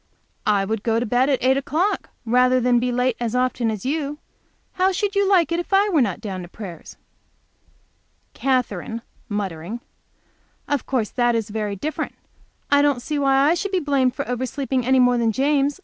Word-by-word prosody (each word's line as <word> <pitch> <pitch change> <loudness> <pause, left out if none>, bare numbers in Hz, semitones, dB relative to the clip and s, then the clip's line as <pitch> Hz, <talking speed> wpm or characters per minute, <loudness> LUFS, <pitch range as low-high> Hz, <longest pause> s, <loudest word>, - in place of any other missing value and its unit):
"I 200 -2 +3
would 220 +1 -2
go 225 0 +1
to 240 - -1
bed 245 +4 +2
at 270 -4 +1
eight 260 +1 +4
o'clock 315 +9 -1 0.2
rather 250 +2 +4
than 245 0 +3
be 250 +1 0
late 250 0 +1
as 240 0 -2
often 250 -2 +1
as 215 -1 -4
you. 290 +1 -2 0.5
How 375 +1 +2
should 400 +2 -1
you 400 -1 +2
like 345 -5 +4
it 335 - +1
if 350 - -5
I 400 +2 +4
were 325 -7 +3
not 200 -7 -1
down 190 -3 -5
to 175 - -8
prayers?" 180 -2 -10 1.4
Katherine, 230 -4 -1 0.3
muttering. 200 0 -4 0.9
"Of 285 -3 -1
course 240 -6 -1
that 240 -1 +2
is 225 -2 -2
very 210 -2 -2
different. 305 +11 -4 0.6
I 285 0 +6
don't 285 -3 +2
see 300 -1 -2
why 275 0 +3
I 320 - +5
should 390 +3 -2
be 375 - +2
blamed 275 -5 +1
for - - -4
oversleeping 255 +1 -2
any 260 0 +4
more 245 -1 +4
than 230 -1 +2
James. 280 - +1
255 Hz, 190 wpm, -22 LUFS, 225-285 Hz, 1.4 s, I